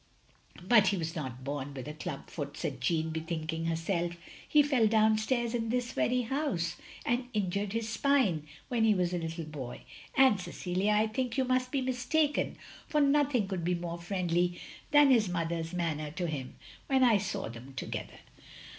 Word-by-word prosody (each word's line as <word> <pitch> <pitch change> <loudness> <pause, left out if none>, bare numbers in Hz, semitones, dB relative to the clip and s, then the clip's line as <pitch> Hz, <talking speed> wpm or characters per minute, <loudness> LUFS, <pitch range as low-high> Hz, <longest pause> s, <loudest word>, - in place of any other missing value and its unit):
" - - -19
"But 220 -4 +6
he 195 +1 +2
was 165 0 -3
not 130 -5 -5
bom 140 0 -4
with 130 +1 -6
a 150 - -5
club 155 - -6
foot," 145 -2 -6
said 130 -3 -4
Jeanne, 160 +3 +1
bethinking 160 0 -3
herself. 170 +1 -1 0.4
"He 300 -1 +6
fell 265 -6 +3
down 215 0 +4
stairs 240 +1 0
in 225 -2 -1
this 245 0 0
very 250 0 +1
house, 225 - -1 0.3
and 245 +1 0
injured 200 0 -1
his 225 -1 -1
spine 225 - +2
— - - -25
when 235 -3 +1
he 220 -2 +5
was 180 -1 0
a 175 - 0
little 165 0 -4
boy. 135 -5 -7 0.4
And, 260 -8 +6
Cecilia, 185 +3 -1
I 210 +1 +4
think 245 +2 -2
you 265 - +2
mtist 255 0 +1
be 275 0 0
mistaken, 260 +4 0 0.3
for 300 - +1
nothing 280 -6 +3
could 190 -3 -3
be 180 +1 +1
more 170 0 -4
friendly 175 -1 0 0.3
than 290 -2 +6
his 220 -6 +4
mother's 165 -1 -2
manner 160 -4 -2
to 175 +4 -3
him 145 -6 -4 0.3
when 265 -1 +3
I 230 -5 +5
saw 195 +1 -3
them 120 +4 -10
together. - - -5
185 Hz, 185 wpm, -31 LUFS, 165-245 Hz, 0.4 s, But